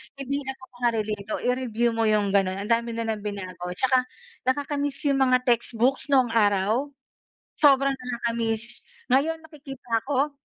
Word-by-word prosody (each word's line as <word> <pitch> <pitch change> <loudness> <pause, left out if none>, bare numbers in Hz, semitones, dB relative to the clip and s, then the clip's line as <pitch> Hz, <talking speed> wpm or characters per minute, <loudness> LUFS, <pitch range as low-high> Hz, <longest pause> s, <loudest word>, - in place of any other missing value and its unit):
hindi 275 +1 -3
ako 265 0 -6 0.2
makarelate. 215 -4 -1
Oh, - - -6
i-review 245 -2 +1
mo 225 0 0
'yong 210 -2 +2
gano'n, 195 -2 +2
ang 210 - -7
dami 230 0 +1
nilang 225 -2 -2
binago. 185 -3 -5
Tsaka 255 +3 +2 0.4
nakaka-miss 285 +1 -1
'yong 280 -2 +2
mga 255 -1 +3
textbooks 240 +2 +1
noong 260 -4 +3
araw, 215 +3 +2 0.7
sobrang 275 -2 +5
nakakamiss. 235 -2 -3 0.3
Ngayon 310 +6 +2
nakikita 270 -7 -5
ko, 285 +1 +1
245 Hz, 140 wpm, -25 LUFS, 220-270 Hz, 0.7 s, sobrang